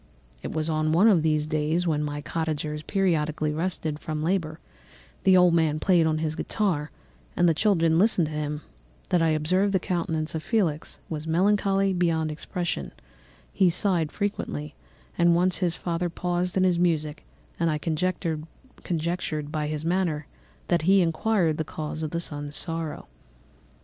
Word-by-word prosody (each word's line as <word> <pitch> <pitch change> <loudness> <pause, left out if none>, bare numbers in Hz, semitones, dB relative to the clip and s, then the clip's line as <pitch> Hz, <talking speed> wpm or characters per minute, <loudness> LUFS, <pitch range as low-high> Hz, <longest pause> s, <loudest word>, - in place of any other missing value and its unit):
"It - - -5
was 155 -1 -1
on 155 -1 +1
one 185 +7 +5
of 190 -7 +5
these 155 -1 +1
days, 155 +3 0
when 150 -3 +1
my 145 0 -3
cottagers 150 -1 -3
periodically 155 -5 0
rested 160 -2 -2
from 155 -1 -4
labour—the 175 +2 -1
old 180 -1 +5
man 160 -2 +2
played 170 -2 +3
on 155 -1 +1
his 155 0 -2
guitar, 170 -7 -1 0.5
and 175 - +4
the 165 - +4
children 165 -3 +3
listened 190 -4 +4
to 155 - -5
him—that 150 - -4
I 165 - +3
observed 180 +6 +1
the 190 - +3
countenance 165 -4 -2
of 160 - -3
Felix 170 -8 -1
was 155 0 -5
melancholy 195 +2 +2
beyond 165 -3 +1
expression; 170 - -4 0.6
he 185 -2 +4
sighed 175 -3 +1
frequently, 80 - -3 0.5
and 170 0 +5
once 180 +1 +1
his 175 -3 +1
father 175 0 -2
paused 180 +2 -2
in 185 - +3
his 180 -2 +3
music, 155 -4 0 0.4
and 170 -1 +2
I 155 - 0
conjectured 165 - -3
by 150 -1 -1
his 155 +1 -3
manner 170 -4 0 0.4
that 175 -1 +3
he 190 +4 +5
inquired 165 -1 +1
the 160 - -1
cause 155 0 -5
of 155 -2 -3
his 170 0 -2
son's 145 -1 -5
sorrow. 165 -2 -4
165 Hz, 155 wpm, -26 LUFS, 155-180 Hz, 0.6 s, one